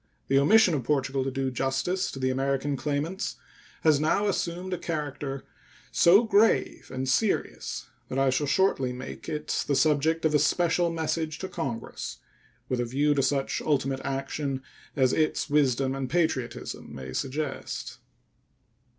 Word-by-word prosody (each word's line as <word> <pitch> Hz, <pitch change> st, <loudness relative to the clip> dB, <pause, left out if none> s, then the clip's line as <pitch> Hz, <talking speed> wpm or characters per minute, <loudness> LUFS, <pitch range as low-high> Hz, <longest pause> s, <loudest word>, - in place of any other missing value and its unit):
The 135 Hz, 0 st, +5 dB
omission 195 Hz, +5 st, +5 dB
of 140 Hz, -4 st, -1 dB
Portugal 135 Hz, 0 st, 0 dB
to 135 Hz, -, -1 dB
do 135 Hz, 0 st, -2 dB
justice 135 Hz, +9 st, -1 dB
to -, -, -7 dB
the 130 Hz, 0 st, 0 dB
American 135 Hz, +2 st, 0 dB
claimants 150 Hz, -, -2 dB, 0.5 s
has 155 Hz, -3 st, +5 dB
now 160 Hz, +7 st, +2 dB
assumed 180 Hz, -1 st, -2 dB
a 180 Hz, -, -2 dB
character 145 Hz, -4 st, -4 dB, 0.5 s
so 190 Hz, +7 st, +6 dB
grave 220 Hz, 0 st, +2 dB
and 130 Hz, 0 st, -3 dB
serious 195 Hz, +11 st, 0 dB, 0.2 s
that 130 Hz, -, -3 dB
I 135 Hz, -1 st, +3 dB
shall 145 Hz, +3 st, 0 dB
shortly 135 Hz, -7 st, +2 dB
make 130 Hz, +1 st, -7 dB
it 150 Hz, 0 st, -2 dB
the 140 Hz, -, +2 dB
subject 155 Hz, +3 st, +2 dB
of 155 Hz, -, +3 dB
a 150 Hz, -, +5 dB
special 170 Hz, +3 st, +2 dB
message 160 Hz, -1 st, -2 dB
to 190 Hz, -, -5 dB
Congress, 120 Hz, -9 st, -5 dB, 0.5 s
with 125 Hz, -, -1 dB
a 120 Hz, -, +1 dB
view 145 Hz, +5 st, +2 dB
to 140 Hz, -, +2 dB
such 135 Hz, 0 st, 0 dB
ultimate 135 Hz, -2 st, 0 dB
action 135 Hz, 0 st, -3 dB, 0.3 s
as 130 Hz, -3 st, +3 dB
its 155 Hz, -1 st, 0 dB
wisdom 135 Hz, -2 st, +2 dB
and 135 Hz, -1 st, -3 dB
patriotism 160 Hz, -8 st, -2 dB
may 65 Hz, -1 st, -7 dB
suggest. 140 Hz, +1 st, -4 dB
145 Hz, 150 wpm, -27 LUFS, 135-160 Hz, 0.5 s, so